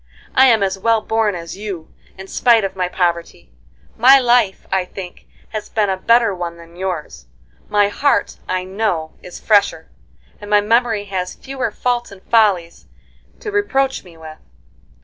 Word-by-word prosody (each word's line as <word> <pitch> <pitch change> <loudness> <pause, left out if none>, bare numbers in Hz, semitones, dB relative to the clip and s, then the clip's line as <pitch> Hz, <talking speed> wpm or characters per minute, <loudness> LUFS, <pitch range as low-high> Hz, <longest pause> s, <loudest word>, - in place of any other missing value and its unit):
I 265 - +6
am 225 -5 +4
as 190 0 -1
well 225 +2 +2
born 220 -3 0
as 170 -1 -7
you 195 -5 -7 0.2
in 190 - -8
spite 230 +2 +3
of 195 -1 -3
my 180 -1 -1
poverty; 170 - -2 0.4
my 260 +4 +7
life, 240 -6 +2
I 190 -1 +1
think, 180 0 -10 0.2
has 215 -1 -6
been 210 -3 0
a - - 0
better 230 +1 +3
one 175 -2 -5
than 170 0 -15
yours; 170 - -5 0.4
my 205 -1 +3
heart, 285 +7 0
I 185 0 -1
know, 185 -5 -2
is 180 - -10
fresher, 205 -2 +1 0.5
and 205 - -10
my 210 0 +5
memory 225 0 +1
has 185 -2 -4
fewer 265 -3 -4
faults 240 +2 -2
and 195 -1 -14
follies 200 -7 +2 0.5
to 430 -4 -5
reproach 275 -10 0
me 170 -3 -16
with. 155 -1 -11
205 Hz, 165 wpm, -18 LUFS, 180-230 Hz, 0.5 s, my